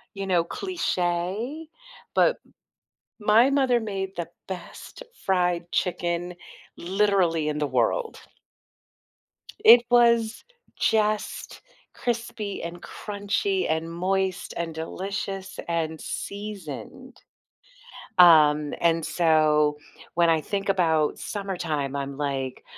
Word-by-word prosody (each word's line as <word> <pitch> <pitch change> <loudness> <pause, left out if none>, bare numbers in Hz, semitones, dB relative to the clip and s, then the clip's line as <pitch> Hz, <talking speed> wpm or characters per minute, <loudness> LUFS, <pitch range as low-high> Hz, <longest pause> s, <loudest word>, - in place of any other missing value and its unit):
you 195 - -4
know, 175 -3 +3
cliche, 215 - -2 0.5
but - - +4 0.8
my 220 +5 +5
mother 260 -4 +3
made 195 -3 -4
the 170 -1 -4 0.2
best 190 - -8 0.2
fried 180 -2 +1
chicken 175 0 -1 0.4
literally 180 -4 +1
in 150 - -2
the 150 - 0
world. 125 -3 0 1.5
It 235 +2 +9
was 235 -2 +4 0.3
just 215 -1 0 0.3
crispy 230 -4 -3
and 170 +1 -7
crunchy 215 - -2
and 160 +1 -1
moist 190 +1 -1
and 165 -2 -3
delicious 195 +3 -5
and 160 -2 -2
seasoned. 205 - -7 1.0
Um, 150 -4 +6
and 165 -1 +2
so, 155 -3 +3 0.4
when 170 -1 +4
I 160 -1 +3
think 200 +4 -3
about 160 -5 +2
summertime, 170 -9 -3
I'm 140 0 -4
like, 135 -3 -3
180 Hz, 95 wpm, -25 LUFS, 160-210 Hz, 1.5 s, It